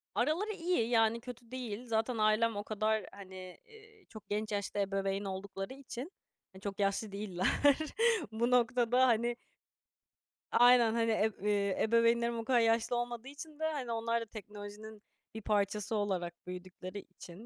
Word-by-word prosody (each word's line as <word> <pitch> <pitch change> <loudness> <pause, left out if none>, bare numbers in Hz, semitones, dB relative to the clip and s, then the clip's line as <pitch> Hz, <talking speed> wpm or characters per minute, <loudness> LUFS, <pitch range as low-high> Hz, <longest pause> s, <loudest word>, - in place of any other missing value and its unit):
Araları 320 - +1
iyi, 335 - 0
yani, 225 -1 +3
kötü 245 -1 -10
değil. 245 -2 -5
Zaten 225 +1 0
ailem 215 +1 +3
o 205 - -3
kadar, 215 0 0
hani, 185 -2 -10
ııı, 435 -2 -18
çok 215 -3 -12
genç 215 +1 -2
yaşta 205 0 -2
ebeveyn 195 0 -1
oldukları 195 +3 -5
için, 275 +3 -7 0.4
hani, 190 - -13
çok 200 0 -5
yaşlı 200 +2 0
değiller. 195 -3 -2 0.8
Bu 235 +3 0
noktada, 245 +1 +4
hani 235 +1 +2 1.2
Aynen. 240 -2 +6
Hani, 230 -1 +2
ev 220 0 +2
ııı, 210 +2 -1 0.3
ebeveynlerim 235 +1 +3
o 225 - -5
kadar 245 -1 +4
yaşlı 230 +1 +2
olmadığı 240 +1 -3
için 295 +2 -10
de, - - -4
hani, 260 -6 -4
onlar 230 0 0
da - - -4
teknolojinin 210 0 -9 0.3
bir 220 - -6
parçası 210 +1 0
olarak 185 -4 -1
büyüdükleri 185 +2 -7
için, 185 +3 -12
220 Hz, 150 wpm, -33 LUFS, 205-240 Hz, 1.2 s, Aynen